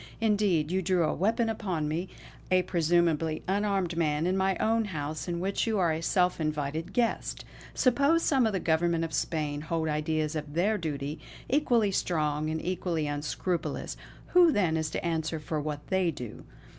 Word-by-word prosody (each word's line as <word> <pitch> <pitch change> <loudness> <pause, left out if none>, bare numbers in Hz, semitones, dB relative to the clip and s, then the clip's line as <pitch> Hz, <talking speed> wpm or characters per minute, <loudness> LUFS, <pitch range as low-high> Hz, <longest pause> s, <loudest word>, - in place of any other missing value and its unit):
Indeed, 205 -8 +2
you 190 +1 +1
drew 180 -1 +2
a - - +1
weapon 225 +4 +1
upon 190 -8 -2
me, 165 +5 -2 0.4
a 185 0 +4
presumably 165 -2 +1
unarmed 195 -3 0
man, 155 -1 +1
in 185 +1 +1
my 190 0 +1
own 225 0 +2
house 155 -5 -4
in 170 -1 -2
which 195 +5 -1
you 220 -2 +1
are 175 -4 +3
a 160 +1 -2
self 180 0 +1
invited 155 +2 -2
guest. 235 -2 -1 0.3
Suppose 280 +6 +3
some 265 -5 +3
of - - 0
the 190 - 0
Government 165 0 +1
of 165 - -4
Spain 150 -2 -1
hold 160 +1 -2
ideas 155 0 -1
of 150 -1 -5
their 205 +5 +2
duty, 150 -2 -4 0.3
equally 240 -7 +2
strong 155 -4 0
and 160 0 -2
equally 175 -3 -1
unscrupulous; 145 +4 -2 0.3
who 355 -2 +6
then 180 - +2
is 160 -1 -1
to 160 - -4
answer 160 -1 -1
for 150 0 -3
what 145 -1 -4
they 190 -2 +2
do. 125 -8 -7
170 Hz, 175 wpm, -29 LUFS, 155-195 Hz, 0.4 s, who